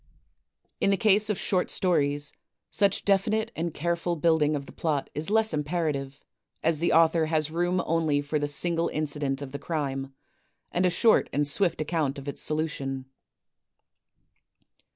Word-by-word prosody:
In -, -, +2 dB
the 195 Hz, -, +3 dB
case 210 Hz, +2 st, +4 dB
of 210 Hz, -, 0 dB
short 185 Hz, -2 st, 0 dB
stories, 145 Hz, -5 st, 0 dB, 0.4 s
such 200 Hz, -2 st, +2 dB
definite 215 Hz, +3 st, +1 dB
and 165 Hz, +1 st, -2 dB
careful 170 Hz, +2 st, -1 dB
build 160 Hz, 0 st, +2 dB
ing 150 Hz, +1 st, +2 dB
of 140 Hz, -1 st, -4 dB
the -, -, -12 dB
plot 150 Hz, -4 st, -2 dB
is 150 Hz, +4 st, -2 dB
less 220 Hz, -2 st, +3 dB
imperative, 150 Hz, -3 st, -2 dB, 0.4 s
as 160 Hz, -1 st, +2 dB
the 170 Hz, -, +1 dB
author 165 Hz, 0 st, +4 dB
has 155 Hz, -1 st, 0 dB
room 175 Hz, +2 st, 0 dB
only 160 Hz, -3 st, +1 dB
for 145 Hz, +1 st, -2 dB
the 145 Hz, -, -1 dB
single 165 Hz, +3 st, +1 dB
incident 145 Hz, -2 st, -2 dB
of 135 Hz, -, -8 dB
the 140 Hz, -, -6 dB
crime, 135 Hz, -4 st, -3 dB, 0.6 s
and 180 Hz, +1 st, +2 dB
a -, -, +3 dB
short 215 Hz, +6 st, +3 dB
and 145 Hz, +1 st, 0 dB
swift 170 Hz, +2 st, +1 dB
account 155 Hz, -3 st, -1 dB
of 140 Hz, 0 st, -9 dB
its 140 Hz, -, -4 dB
solution. 140 Hz, -4 st, -3 dB
160 Hz, 160 wpm, -27 LUFS, 145-175 Hz, 0.6 s, case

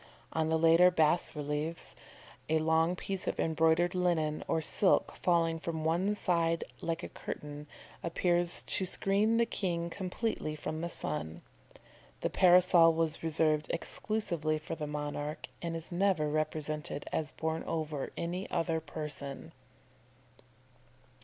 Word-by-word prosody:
On 160 Hz, 0 st, +1 dB
the 160 Hz, -, +3 dB
later 165 Hz, +2 st, +6 dB
bas 165 Hz, -1 st, +2 dB
reliefs, 150 Hz, +3 st, -3 dB, 0.6 s
a 160 Hz, -, +3 dB
long 160 Hz, +2 st, +2 dB
piece 190 Hz, +1 st, -4 dB
of -, -, -2 dB
embroidered 165 Hz, +2 st, +2 dB
linen 170 Hz, -4 st, 0 dB
or -, -, +1 dB
silk 185 Hz, +5 st, +2 dB
falling 165 Hz, -2 st, +1 dB
from 160 Hz, -1 st, -4 dB
one 180 Hz, +6 st, +1 dB
side 165 Hz, -4 st, +1 dB, 0.2 s
like 165 Hz, +1 st, -2 dB
a -, -, -3 dB
curtain, 150 Hz, 0 st, -7 dB, 0.3 s
appears 175 Hz, +1 st, +1 dB
to -, -, 0 dB
screen 205 Hz, +5 st, +2 dB
the 235 Hz, -, +4 dB
king 170 Hz, -6 st, -2 dB
completely 185 Hz, -4 st, -3 dB
from 155 Hz, +1 st, -4 dB
the 170 Hz, -, -2 dB
sun. 80 Hz, -, -3 dB, 0.8 s
The -, -, -1 dB
parasol 175 Hz, -2 st, +6 dB
was 160 Hz, -1 st, 0 dB
reserved 155 Hz, -1 st, +1 dB
exclusively 170 Hz, -4 st, -1 dB
for 155 Hz, +1 st, -6 dB
the 155 Hz, -2 st, -4 dB
monarch, 145 Hz, 0 st, -4 dB, 0.2 s
and 170 Hz, -1 st, -3 dB
is 165 Hz, +1 st, -6 dB
never 175 Hz, -4 st, +2 dB
represented 155 Hz, -1 st, -2 dB
as 155 Hz, -1 st, -2 dB
borne 160 Hz, 0 st, -2 dB
over 155 Hz, -4 st, -3 dB
any 180 Hz, +3 st, -3 dB
other 165 Hz, -2 st, 0 dB
person." 145 Hz, -3 st, -5 dB
165 Hz, 135 wpm, -32 LUFS, 155-175 Hz, 0.8 s, later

